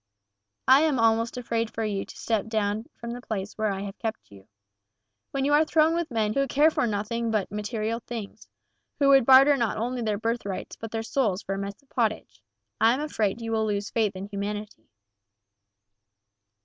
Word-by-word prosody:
I 265 +2 +7
am 310 -4 +2
almost 230 +1 +2
afraid 230 -2 -1
for 225 - -3
you 200 -2 -2
to - - -12
step 220 -2 -1
down 215 0 -1
from 235 0 -7
the 245 +1 -6
place 200 -4 -4
where 215 -1 0
I 195 0 -3
have 200 0 -7
kept 225 - -5
you. 100 0 -15 0.8
When 275 -1 -1
you 290 - +2
are 300 +2 +6
thrown 315 0 +3
with 340 -1 -1
men 220 -3 0
who 275 +2 +1
care 295 +5 +4
for 290 -5 0
nothing 225 +2 -2
but 215 -4 -1
material 215 +2 -2
things, 225 -3 -8 0.5
who 280 -1 +3
would 270 -3 +6
barter 270 +2 +8
not 235 -5 -1
only 245 +3 -2
their 215 -2 0
birthrights 225 -3 -3
but 225 - -7
their 225 0 -3
souls 225 -5 0
for 195 - -3
a 195 - -3
mess 200 0 -5
of 280 - -33
pottage, - - -2 0.4
I 225 +2 +5
am - - -4
afraid 225 -7 -1
you 225 0 -4
will 220 -1 +1
lose 205 -1 -2
faith 215 -4 0
in 190 +1 -5
humanity." 205 -1 -6
225 Hz, 195 wpm, -26 LUFS, 210-250 Hz, 0.8 s, barter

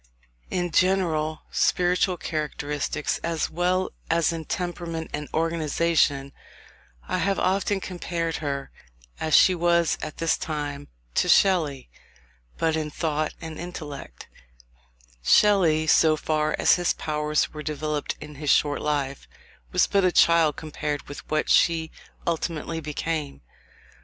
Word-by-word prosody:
In 175 -1 -1
general 160 -3 +1
spiritual 180 +1 +2
characteristics, 150 -2 -3
as 165 -1 -2
well 180 +2 0 0.2
as 165 0 +2
in 165 -1 -5
temperament 170 -2 -4
and 150 0 -4
organisation, 160 -3 +1 0.7
I 185 - -1
have 195 +3 +1
often 195 +1 +1
compared 170 -3 -3
her, 140 -2 -4 0.5
as 155 -1 +2
she 185 - +7
was 170 -1 +2
at 155 - -6
this 165 -1 +1
time, 145 -2 -4 0.3
to - - +1
Shelley: 160 -9 +3 0.7
but 160 -1 +1
in 155 -1 -2
thought 155 0 -2
and 160 -1 -7
intellect, 150 - -8 0.9
Shelley, 165 - +4
so 155 0 +4
far 155 0 0
as - - +4
his 175 -1 +1
powers 150 -1 -1
were 150 - -6
developed 150 -1 -3
in 150 0 -9
his 150 - -2
short 145 +1 +3
life, 140 -2 -2 0.4
was - - +4
but 200 -1 +1
a 185 - +4
child 165 -4 +4
compared 150 -2 -4
with 145 - -10
what 155 0 0
she 160 -2 +3 0.3
ultimately 165 -1 -2
became. 150 - -4
160 Hz, 125 wpm, -25 LUFS, 150-170 Hz, 0.9 s, she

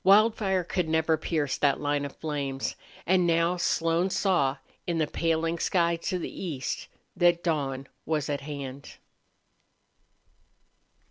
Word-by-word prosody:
Wildfire 200 -1 +4
could 175 -1 -1
never 160 0 +3
pierce 155 -2 -1
that 140 -2 +3
line 145 -1 0
of 140 - -7
flames. 140 -3 -3 0.3
And 180 0 +3
now 170 +1 +2
Slone 170 +1 +1
saw, 170 -9 +2 0.3
in 170 -2 0
the 155 - +2
paling 165 +1 0
sky 170 -1 +2
to 180 +2 -2
the 180 - -6
east, 145 -8 -3 0.3
that 175 -1 +3
dawn 140 -5 -1 0.2
was 150 -2 -1
at 145 -2 -2
hand. 140 -1 -7
165 Hz, 130 wpm, -28 LUFS, 145-175 Hz, 0.3 s, Wildfire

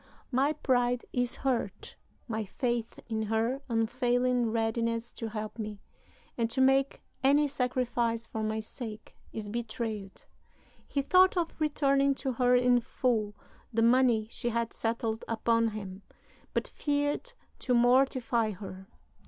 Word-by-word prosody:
My 270 +4 +2
pride 245 -4 +1
is 245 -1 0
hurt; 265 -3 -2 0.3
my 220 -2 -2
faith 235 +2 -2
in 220 -1 -2
her 225 +5 0
unfailing 245 +1 +1
readiness 230 +1 -1
to 230 - -5
help 215 +1 -5
me, 210 -2 -5 0.6
and 230 -2 0
to 260 - -3
make 270 +1 +3 0.2
any 290 +2 +5
sacrifice 245 -3 -1
for 220 - -5
my 215 0 -1
sake, 220 -1 -8 0.2
is 215 -2 -5
betrayed." 220 -3 -4 0.6
He 280 - -1
thought 370 +5 +5
of 335 -2 0
returning 280 -2 +2
to 270 0 -2
her 250 0 +3
in 245 0 +4
full 225 -4 -1 0.4
the 225 -1 +2
money 235 -2 +4
she 240 - -2
had 235 0 -1
settled 225 -1 -2
upon 230 0 +2
him, 200 -3 -6 0.5
but - - 0
feared 290 +11 -1 0.3
to 250 - +1
mortify 245 -2 +3
her. 190 0 -9
235 Hz, 135 wpm, -30 LUFS, 225-260 Hz, 0.6 s, any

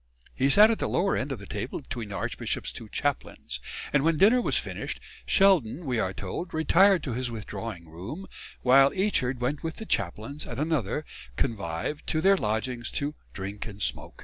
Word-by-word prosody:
He 135 +1 +2
sat 210 +9 +8
at 225 - -1
the - - -1
lower 195 +2 +2
end 135 +2 -2
of 135 - -2
the 100 - -10
table 105 +6 -4
between 120 -6 -6
the 100 - -5
archbishop's 85 - -2
two 110 - -8
chaplains; 145 +3 -3 0.3
and 140 -1 +4
when 165 0 +3
dinner 225 +9 +6
was - - +2
finished, - - -4 0.3
Sheldon, 175 - +4
we 125 -4 0
are 95 -4 0
told, 100 - -5
retired 185 +4 +5
to 130 - -3
his 125 +1 -1
withdrawing 100 -6 -6
room, 95 - -7 0.4
while 135 +2 +7
Eachard 185 -10 +1
went 135 +4 -1
with 160 0 -4
the 220 - -7
chaplains 110 - -2
and - - -5
another 150 -3 0 0.3
convive 100 - -2
to 155 - +1
their 195 +4 +5
lodgings 120 - -1
"to 145 +1 -1 0.2
drink 100 +3 -5
and 100 -2 -9
smoak." - - -2
135 Hz, 185 wpm, -27 LUFS, 110-160 Hz, 0.4 s, sat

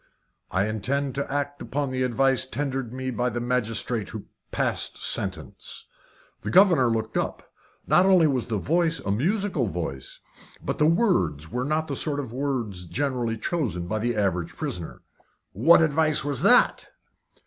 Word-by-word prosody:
"I 95 +2 +1
intend 130 +6 -1
to 140 0 -3
act 145 0 -2
upon 140 -1 -2
the 130 0 -2
advice 130 +1 +2
tendered 135 -3 -3
me 130 +1 -4
by 125 0 0
the 120 0 -3
magistrate 120 -2 -1
who 110 - -7 0.2
passed - - -1
sentence." - - -2 0.6
The 105 - -4
governor 170 - +5
looked 110 -1 -2
up. - - -4 0.3
Not 185 +2 +4
only 185 -4 +6
was 130 -6 0
the 110 -3 -1
voice 165 - +1
a 100 - -2
musical 170 - 0
voice, 80 -8 -5 0.5
but - - -2
the 150 - +4
words 165 - +1
were 125 +1 -2
not 155 +2 0
the 140 - -3
sort 145 +1 0
of 130 -5 -5
words 120 -10 -2
generally 125 -2 -1
chosen 110 - -2
by 110 +5 -2
the 120 +2 -1
average 95 -5 -1
prisoner. 85 -3 -5 0.5
"What 165 - +5
advice 155 -1 +1
was 145 -4 -2
that?" - - +4
130 Hz, 160 wpm, -25 LUFS, 110-145 Hz, 0.6 s, only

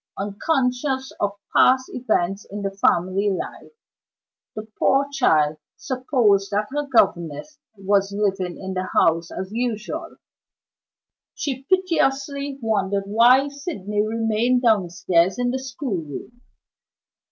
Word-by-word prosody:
Unconscious 260 +5 -1
of 200 -1 0 0.2
past 260 0 +5
events 205 -5 -1
in 205 +1 -6
the 195 - -1
family 195 +1 +1
life, 190 - -5 0.8
the 215 - -6
poor 275 +1 +3
child 155 - +2 0.2
supposed 240 -7 +1
that 205 +1 0
her 295 0 -2
governess 200 - 0 0.2
was 195 0 +1
living 195 -3 -1
in 190 0 -6
the 185 0 -3
house 165 0 +3
as 190 +1 -6
usual. 230 -1 -3 1.2
She 270 -2 -4
piteously 280 -6 0
wondered 200 -3 0
why 240 +7 +5
Sydney 210 - -3
remained 225 +3 +1
downstairs 185 -4 +2
in 245 0 0
the 260 - -2
schoolroom. 240 - -6
215 Hz, 110 wpm, -22 LUFS, 195-260 Hz, 1.2 s, past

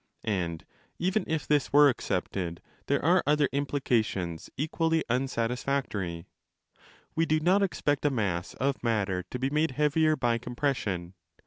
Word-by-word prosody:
And 85 -6 -2 0.3
even 190 +4 0
if 160 -3 -1
this 145 -3 +1
were 145 +1 +7
accepted, 90 -8 -2 0.3
there 140 0 +1
are 175 +2 +5
other 150 -1 +4
implications 115 - -1
equally 160 +2 +1
unsatisfactory. 120 -8 -1 0.9
Wedo 160 -1 +2
not 185 +4 +4
expect 145 -7 0
a 145 - +4
mass 100 -9 -2
of 140 +1 -1
matter 100 -6 0
to - - -4
be 130 +2 -1
made 150 +2 +2
heavier 155 +1 +3
by 120 -4 +1
compression. 120 -8 -2
135 Hz, 130 wpm, -28 LUFS, 100-150 Hz, 0.9 s, were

